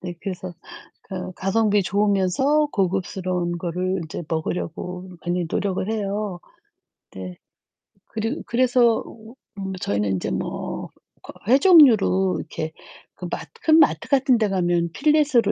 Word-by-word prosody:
네. 175 -1 -6
그래서 185 -1 -5 0.5
그 185 -2 -6
가성비 205 +2 +2
좋으면서 205 - +2
고급스러운 180 -2 -1
거를 180 +2 -2
이제 160 - -6
먹으려고 180 +3 -4 0.2
많이 175 0 -1
노력을 195 0 -1
해요. 205 -3 -2 0.7
네. 90 -1 -8 0.7
그리고 225 +6 -3
그래서 240 -1 +3 0.5
음 195 -1 -4
저희는 100 -1 0
인제 95 - -2
뭐 65 - -4 0.3
그 - - -10
회 255 +4 +6
종류로 225 - +6
이렇게 155 0 -5 0.4
그 - - -8
마 - - -2 0.2
큰 315 0 +6
마트 310 - +3
같은 265 -3 +4
데 220 -2 +1
가면 175 -3 0
필렛으로 290 -7 +3
190 Hz, 265 characters per minute, -23 LUFS, 175-225 Hz, 0.7 s, 회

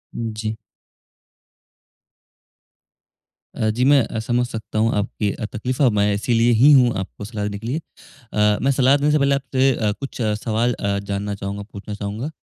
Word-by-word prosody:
जी। 110 -1 -3 3.0
अ, 110 -4 0
जी 120 +3 -1
मैं 140 -1 +6
अ, 110 - -4
समझ 120 +2 0
सकता 110 -2 -5
हूँ 115 +1 +2
आपकी 105 0 -1
अ, 110 - -5
तकलीफ़ 125 +4 -4 0.2
मैं 100 0 +3
इसीलिए 115 +3 +2
ही 145 +3 +8
हूँ 125 -3 +5
आपको 95 +2 -7
सलाह 105 -1 -5
देने 100 -1 -4
के 115 - -7
लिए। 145 +6 -1 0.5
अ, 105 0 +2
मैं 135 - +3
सलाह 135 +1 +4
देने 145 +1 +1
से 150 - +4
पहले 140 0 +3
आपसे 135 -1 +1
अ, 105 -3 0
कुछ 135 -1 -6
सवाल 110 +2 0
अ, 100 -1 -1
जानना 100 +1 -3
चाहूँगा, 100 +1 -5
पूछना 105 +1 -7
चाहूँगा। 105 +8 -4
110 Hz, 170 wpm, -21 LUFS, 105-130 Hz, 3.0 s, ही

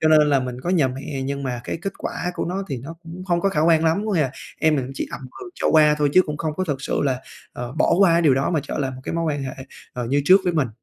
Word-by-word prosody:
cho 155 - +3
nên 155 -1 +6
là 140 -2 +3
mình 125 0 -5
có 175 - -2
nhờ 155 -8 +3
mẹ 135 +1 -5
nhưng 140 +1 -3
mà 125 -2 -3
cái - - -3
kết 195 - -3
quả 180 - -3
của - - -2
nó 190 +3 -2
thì 135 - -3
nó 145 +7 -8
cũng 170 +3 -9
không 175 -2 +1
có 195 - +2
khả 150 -5 0
quan 165 0 +4
lắm. 165 +6 +2
Có 210 - -1
nghĩa 170 - +2
là 135 -3 +1 0.3
em 155 -1 +3
mình 130 - -1
cũng 135 - -7
chỉ - - -3
ậm - - -6 0.2
ừ 370 - -8
cho - - -1
qua 150 -1 +6
thôi 145 -1 +2
chứ 185 - +7
cũng 150 -1 -4
không 155 -1 -2
có 185 - 0
thực 140 -4 -3
sự - - -1
là, 130 -2 0 0.3
à, 125 - -7 0.2
bỏ - - +4
qua 195 -4 +6
cái 170 +1 +3
điều 140 -5 +5
đó 135 +4 0
mà 160 -4 +1
trở - - -5
lại 135 -2 -1
một 130 - -9
cái - - -3
mối 165 0 0
quan 145 -3 -1
hệ, 130 -1 -5 0.4
ờ, 125 -1 -4
như 140 +3 +1
trước 190 +4 +7
với 180 - +1
mình. 145 -7 +1
150 Hz, 335 wpm, -22 LUFS, 135-170 Hz, 0.4 s, chứ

